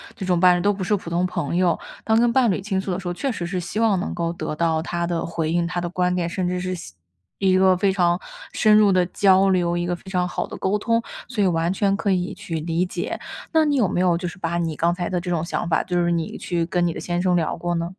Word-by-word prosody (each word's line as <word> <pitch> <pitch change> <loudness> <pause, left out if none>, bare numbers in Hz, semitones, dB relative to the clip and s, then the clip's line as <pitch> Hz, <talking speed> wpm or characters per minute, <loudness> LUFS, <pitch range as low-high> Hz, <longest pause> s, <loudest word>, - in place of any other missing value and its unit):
这 190 - -5
种 180 -2 +2
伴 180 -1 +6
侣 175 - -2
都 205 +2 +2
不 190 -1 -4
是 205 +3 +2
普 170 -3 -7
通 175 +1 +1
朋 160 -2 -3
友。 180 -2 +2 0.3
当 220 0 +3
跟 235 0 +3
伴 255 -4 +4
侣 190 - 0
倾 190 -1 -2
诉 190 - -6
的 180 - -2
时 180 - -7
候， 175 - -1
确 270 +9 -2
实 175 -6 -4
是 180 +1 -2
希 175 +5 -4
望 220 -5 +3
能 185 - -4
够 170 -1 -1
得 155 - -4
到 160 -1 +1
他 170 0 -2
的 170 -1 -2
回 165 -1 -2
应、 170 0 +1
他 175 0 -2
的 175 - -2
观 180 0 0
点， 175 -2 -1
甚 180 +1 -2
至 180 0 -1
是 185 0 -3
细 90 - -8 0.4
一 190 -1 +3
个 185 -1 +4
非 195 +1 +2
常 175 -2 +2 0.3
深 215 -1 +4
入 210 -1 +6
的 185 -1 +3
交 190 0 +4
流， 175 -2 +1
一 175 - -1
个 175 0 -1
非 190 - -13
常 180 -1 0
好 - - -3
的 - - -8
沟 200 +2 0
通， 230 +2 +1 0.3
所 225 -5 -1
以 - - +3
完 170 -1 +1
全 195 0 +1
可 205 -1 -2
以 180 -1 0
去 180 -5 -5
理 165 +2 0
解。 185 - -4 0.3
那 320 -1 +5
你 295 -2 +1
有 235 -8 +3
没 180 - -1
有 175 -2 +3
就 180 0 -4
是 185 +3 -8
把 170 0 -1
你 165 -2 -1
刚 170 +3 +2
才 175 -1 -3
的 180 -2 -1
这 180 - -5
种 170 -1 0
想 170 - -3
法， 160 - +2
就 175 -1 0
是 175 - +1
你 165 -2 -1
去 170 -2 -1
跟 175 0 0
你 165 - -1
的 - - -6
先 175 0 -2
生 180 -1 +2
聊 165 -3 0
过 175 +1 -2
呢？ 170 0 -2
180 Hz, 315 characters per minute, -22 LUFS, 170-190 Hz, 0.4 s, 伴